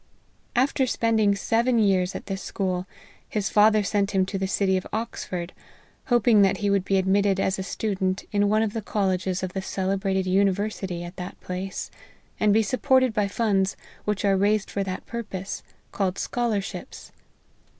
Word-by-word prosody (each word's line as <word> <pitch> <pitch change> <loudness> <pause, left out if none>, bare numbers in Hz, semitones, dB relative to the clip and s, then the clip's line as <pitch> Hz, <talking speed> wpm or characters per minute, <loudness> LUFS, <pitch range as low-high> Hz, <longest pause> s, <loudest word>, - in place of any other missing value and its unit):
After 260 +1 +2
spend 230 -2 +1
ing 205 -2 +4
seven 235 +4 +1
years 195 -4 +2
at - - -6
this 195 -1 -4
school, 185 -1 -2 0.4
his 210 -2 -1
father 210 0 +5
sent 200 0 0
him 190 -1 +3
to 195 0 -4
the 190 - -1
city 190 0 +1
of 185 - -2
Oxford, 185 -5 -4 0.5
hoping 240 -3 +4
that 195 -1 +4
he 205 -1 0
would 200 -2 +2
be 195 0 +1
admitted 195 +1 +2
as 190 0 0
a - - -1
student 190 0 -2
in 205 0 +2
one 215 +1 +3
of 215 -2 -2
the 225 - -2
colleges 190 -2 -1
of 185 -1 -3
the 190 - -2
celebrated 190 0 -1
university 190 -1 0
at 175 +1 -9
that 180 0 -7
place, 185 +1 -5 0.5
and 210 - +4
be 220 +2 +4
supported 260 +2 +2
by 210 -2 +1
funds 195 -3 +1 0.3
which 210 -1 -1
are 195 -1 +4
raised 205 +2 +1
for 200 - -1
that 185 -1 -5
purpose, 205 -5 -5 0.3
called 190 -2 -1
scholarships. 225 -5 -3
200 Hz, 170 wpm, -25 LUFS, 190-215 Hz, 0.5 s, father